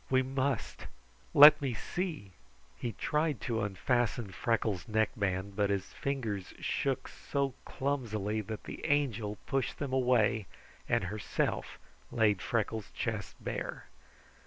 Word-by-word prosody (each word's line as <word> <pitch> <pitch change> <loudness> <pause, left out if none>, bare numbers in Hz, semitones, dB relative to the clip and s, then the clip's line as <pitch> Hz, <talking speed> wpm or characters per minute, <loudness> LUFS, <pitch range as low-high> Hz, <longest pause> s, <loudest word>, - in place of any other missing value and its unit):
We 130 0 +4
must! 130 -1 -2 0.4
Let 150 +1 +10
me 130 -4 -1
see!" 155 - -4 0.4
He 120 -2 -4
tried 150 +2 0
to 115 -1 -1
unfasten 115 +1 0
Freckles' 105 -4 0
neckband, 100 -3 0
but 100 -1 +2
his 100 -1 -2
fingers 115 -9 -3
shook - - -1
so 140 -2 -2
clumsily 110 -6 -1
that 110 +1 -6
the - - -8
Angel 115 -8 +1
pushed 135 -1 -1
them 140 -3 -3
away 120 -5 +3 0.4
and - - +2
herself 105 +3 -2 0.3
laid 105 -5 +3
Freckles' 110 -2 -1
chest - - -3
bare. - - -5
115 Hz, 120 wpm, -32 LUFS, 105-135 Hz, 0.4 s, Let